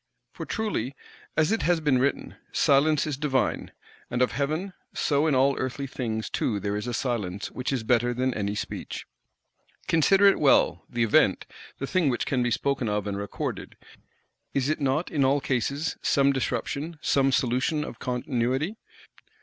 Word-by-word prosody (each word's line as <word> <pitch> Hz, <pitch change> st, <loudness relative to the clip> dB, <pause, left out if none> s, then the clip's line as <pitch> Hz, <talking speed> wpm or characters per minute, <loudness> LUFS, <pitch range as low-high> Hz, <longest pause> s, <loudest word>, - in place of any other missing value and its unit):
For -, -, -7 dB
truly, 200 Hz, -, -2 dB, 0.4 s
as 155 Hz, +4 st, +3 dB
it 225 Hz, -, +1 dB
has 175 Hz, +1 st, +2 dB
been 145 Hz, -5 st, +2 dB
written, 140 Hz, +2 st, -1 dB, 0.2 s
"Silence 145 Hz, +2 st, +3 dB
is 150 Hz, -4 st, -3 dB
divine," 135 Hz, -4 st, 0 dB, 0.4 s
and 125 Hz, +1 st, +1 dB
of 125 Hz, -, +1 dB
Heaven; 155 Hz, +7 st, -2 dB, 0.2 s
so 145 Hz, +1 st, +2 dB
in 150 Hz, -, +2 dB
all 135 Hz, +1 st, +3 dB
earthly 130 Hz, +2 st, -3 dB
things 115 Hz, -5 st, -3 dB
too 105 Hz, -3 st, -1 dB
there 100 Hz, +1 st, -2 dB
is 105 Hz, +3 st, -3 dB
a 120 Hz, -, -2 dB
silence 105 Hz, -7 st, -2 dB
which 125 Hz, +1 st, -3 dB
is 130 Hz, -4 st, -1 dB
better 120 Hz, +1 st, +2 dB
than 130 Hz, +1 st, 0 dB
any 100 Hz, -1 st, -2 dB
speech. 110 Hz, +1 st, -5 dB, 0.8 s
Consider 195 Hz, +5 st, +4 dB
it 200 Hz, -, +6 dB
well, 140 Hz, -, +4 dB
the 120 Hz, -1 st, 0 dB
Event, 110 Hz, -, +3 dB, 0.3 s
the 135 Hz, -, -3 dB
thing 170 Hz, 0 st, +1 dB
which 120 Hz, -, -1 dB
can 130 Hz, -3 st, 0 dB
be 120 Hz, -, +1 dB
spoken 130 Hz, 0 st, 0 dB
of 105 Hz, -1 st, -1 dB
and 100 Hz, -1 st, -2 dB
recorded, 100 Hz, -, -5 dB, 0.8 s
is 140 Hz, 0 st, +1 dB
it 155 Hz, 0 st, -1 dB
not, 140 Hz, +5 st, 0 dB
in 145 Hz, -, +1 dB
all 135 Hz, +2 st, +3 dB
cases, 140 Hz, +4 st, -1 dB
some 140 Hz, 0 st, +3 dB
disruption, 145 Hz, +4 st, -2 dB
some 135 Hz, -1 st, +3 dB
solution 130 Hz, +4 st, +1 dB
of 120 Hz, -, -8 dB
continuity? 125 Hz, -, -1 dB
135 Hz, 170 wpm, -26 LUFS, 120-150 Hz, 0.8 s, it